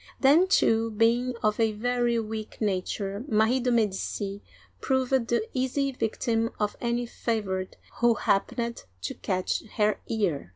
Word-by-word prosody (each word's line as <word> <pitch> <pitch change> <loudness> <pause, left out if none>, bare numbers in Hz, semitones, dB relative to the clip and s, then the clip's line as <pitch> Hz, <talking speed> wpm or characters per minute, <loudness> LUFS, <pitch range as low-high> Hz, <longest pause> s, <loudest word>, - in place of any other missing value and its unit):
Then, 300 +7 +5
too, 230 - +3
being 235 +3 +2
of 215 +1 +1
a 220 -1 +2
very 240 +2 +1
weak 220 -1 -5
nature, 200 0 -2
Marie 220 +3 +3
de' 250 0 0
Medici 205 -3 -1 0.4
proved 260 -2 +1
the 235 -2 0
easy 270 +2 0
victim 230 -1 -1
of 210 -1 0
any 240 0 0
favorite 205 -6 -3 0.2
who 235 -1 +4
happened 235 - -1 0.2
to - - -2
catch 185 -2 -2
her 210 -1 +2
ear. 185 - -1
225 Hz, 135 wpm, -27 LUFS, 210-245 Hz, 0.4 s, Then